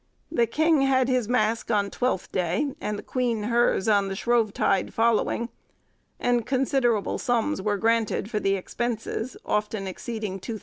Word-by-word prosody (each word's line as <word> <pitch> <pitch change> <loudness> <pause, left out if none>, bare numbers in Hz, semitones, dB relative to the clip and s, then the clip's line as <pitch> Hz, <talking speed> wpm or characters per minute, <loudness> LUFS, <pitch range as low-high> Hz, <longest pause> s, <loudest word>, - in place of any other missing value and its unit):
The 235 -8 +2
king 315 +4 +3
had 260 -2 +3
his 250 -4 +1
mask 230 -2 +1
on 205 -3 +1
Twelfth 250 -7 -1
Day, 185 - 0
and 210 0 -2
the - - -8
queen 240 -4 -1
hers 235 -2 +2
on 200 -2 +3
the 195 - -3
Shrovetide 215 -4 +1
following, 230 +1 +1 0.7
and 245 -1 +1
considerable 250 -3 +1
sums 245 -1 0
were 205 +1 0
granted 225 -1 +1
for 215 -1 -2
the 195 -1 +1
expenses, 230 +4 -3
often 210 -1 -1
exceeding 210 0 -5
£2000. 220 +3 -5
230 Hz, 155 wpm, -25 LUFS, 205-245 Hz, 0.7 s, king